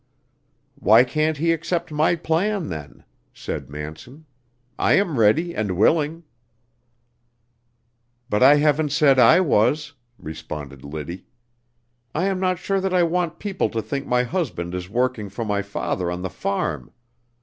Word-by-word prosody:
"Why 110 Hz, +3 st, +6 dB
can't 155 Hz, +4 st, 0 dB
he 165 Hz, +3 st, +1 dB
accept 165 Hz, 0 st, -3 dB
my 155 Hz, +3 st, +2 dB
plan, 175 Hz, +4 st, -1 dB
then?" 75 Hz, -4 st, -8 dB, 0.3 s
said -, -, -6 dB
Manson. 80 Hz, -, -9 dB, 0.5 s
"I -, -, +3 dB
am 170 Hz, -, +2 dB
ready 155 Hz, +12 st, +3 dB
and 100 Hz, -5 st, -2 dB
willing." 155 Hz, -, +2 dB, 2.0 s
"But 105 Hz, 0 st, 0 dB
I 135 Hz, +3 st, +8 dB
haven't 150 Hz, +1 st, +2 dB
said 145 Hz, -3 st, +4 dB
I 125 Hz, +9 st, +7 dB
was," 150 Hz, -, +1 dB, 0.2 s
responded 75 Hz, -4 st, -8 dB
Liddy. 80 Hz, +5 st, -7 dB, 0.9 s
"I 170 Hz, +5 st, +1 dB
am 195 Hz, -1 st, 0 dB
not 185 Hz, -1 st, 0 dB
sure 195 Hz, +3 st, -1 dB
that 190 Hz, -1 st, -1 dB
I 180 Hz, -, +4 dB
want 170 Hz, 0 st, -1 dB
people 195 Hz, -2 st, -2 dB
to 115 Hz, -, -2 dB
think 140 Hz, +6 st, -4 dB
my 125 Hz, 0 st, +2 dB
husband 115 Hz, -, -3 dB
is 90 Hz, 0 st, -5 dB
working 120 Hz, -2 st, -1 dB
for 110 Hz, +4 st, -5 dB
my 100 Hz, -1 st, 0 dB
father 95 Hz, -2 st, -3 dB
on 90 Hz, +1 st, -4 dB
the 95 Hz, -, -4 dB
farm. 85 Hz, -9 st, -3 dB
130 Hz, 145 wpm, -22 LUFS, -, 2.0 s, I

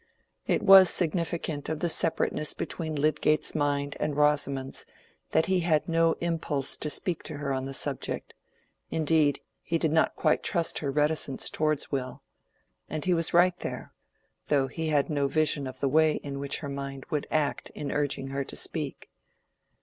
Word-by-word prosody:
It -, -, +1 dB
was 190 Hz, -1 st, +9 dB
significant 165 Hz, -3 st, -1 dB
of 160 Hz, -1 st, -2 dB
the 175 Hz, -, 0 dB
separateness 160 Hz, -2 st, 0 dB
between 160 Hz, -2 st, -4 dB
Lydgate's 155 Hz, +1 st, +1 dB
mind 145 Hz, 0 st, -1 dB
and 150 Hz, -1 st, -2 dB
Rosamond's 145 Hz, -2 st, +1 dB, 0.5 s
that 160 Hz, -, +2 dB
he 190 Hz, -1 st, +2 dB
had 165 Hz, -3 st, +1 dB
no 165 Hz, 0 st, +3 dB
impulse 165 Hz, -5 st, -2 dB
to 150 Hz, -, -2 dB
speak 170 Hz, +2 st, 0 dB
to -, -, -5 dB
her 140 Hz, -1 st, -2 dB
on 130 Hz, 0 st, -2 dB
the 135 Hz, -, -6 dB
subject; -, -, -3 dB, 0.6 s
indeed, 155 Hz, -2 st, +2 dB, 0.2 s
he 165 Hz, -, -1 dB
did 160 Hz, -2 st, 0 dB
not 160 Hz, 0 st, +2 dB
quite 155 Hz, -, +2 dB
trust 170 Hz, -1 st, 0 dB
her 140 Hz, -, -3 dB
reticence 150 Hz, -1 st, 0 dB
towards 155 Hz, -2 st, 0 dB
Will. 130 Hz, -2 st, -4 dB, 0.7 s
And 155 Hz, 0 st, -4 dB
he 185 Hz, -, +3 dB
was 165 Hz, -1 st, 0 dB
right 175 Hz, +1 st, +4 dB
there; -, -, -6 dB, 0.5 s
though 140 Hz, -2 st, +2 dB
he 160 Hz, +4 st, -4 dB
had 145 Hz, -2 st, +2 dB
no 145 Hz, -3 st, 0 dB
vision 150 Hz, -1 st, +1 dB
of 130 Hz, -, -9 dB
the 140 Hz, -, +2 dB
way 155 Hz, +2 st, +4 dB
in 140 Hz, -1 st, -5 dB
which 140 Hz, 0 st, -1 dB
her 145 Hz, -, -5 dB
mind 140 Hz, -1 st, -6 dB
would 150 Hz, -2 st, -1 dB
act 150 Hz, -2 st, -1 dB
in 145 Hz, -, -4 dB
urging 140 Hz, -2 st, -1 dB
her 140 Hz, 0 st, -2 dB
to -, -, -8 dB
speak. -, -, -2 dB
150 Hz, 175 wpm, -28 LUFS, 140-160 Hz, 0.7 s, was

